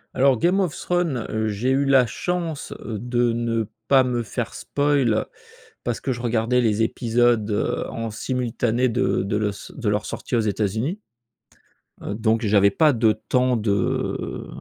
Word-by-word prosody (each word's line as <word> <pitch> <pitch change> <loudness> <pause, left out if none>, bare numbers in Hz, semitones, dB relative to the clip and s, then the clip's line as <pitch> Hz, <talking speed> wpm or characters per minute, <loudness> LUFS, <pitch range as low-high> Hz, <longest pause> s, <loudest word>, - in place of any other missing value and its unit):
Alors, 135 -1 +4
Game 180 - +2
of 180 -6 0
Thrones, 170 -10 -1
heu, 110 0 -1
j'ai 110 +5 -1
eu 135 +1 +2
la 135 -2 +5
chance, 170 +3 -3
heu, 110 -3 -4
de 120 0 +1
ne 115 -1 -1 0.2
pas 135 -1 +6
me 125 -2 -1
faire 115 +1 -4
spoil 140 -6 +1 0.6
parce 120 -2 -2
que 135 - -1
je 120 -1 -5
regardais 120 +1 +1
les 110 -1 +2
épisodes, 115 -1 +1
heu, 105 - -1
en 115 -1 -4
simultané 120 +1 -1
de 120 -4 +1
de 100 +2 -1
los 105 -1 +1 0.3
de 120 -6 -2
leur 105 0 -1
sortie - - -5
aux 120 - +3
États-Unis. 110 - -1 1.0
Heu, 100 - -4
donc, 110 +1 +1
j'avais 100 -2 +4
pas 155 +7 +4
de 115 -3 +3 0.2
temps 125 -1 +2
de 105 -3 -1
120 Hz, 165 wpm, -23 LUFS, 110-130 Hz, 1.0 s, pas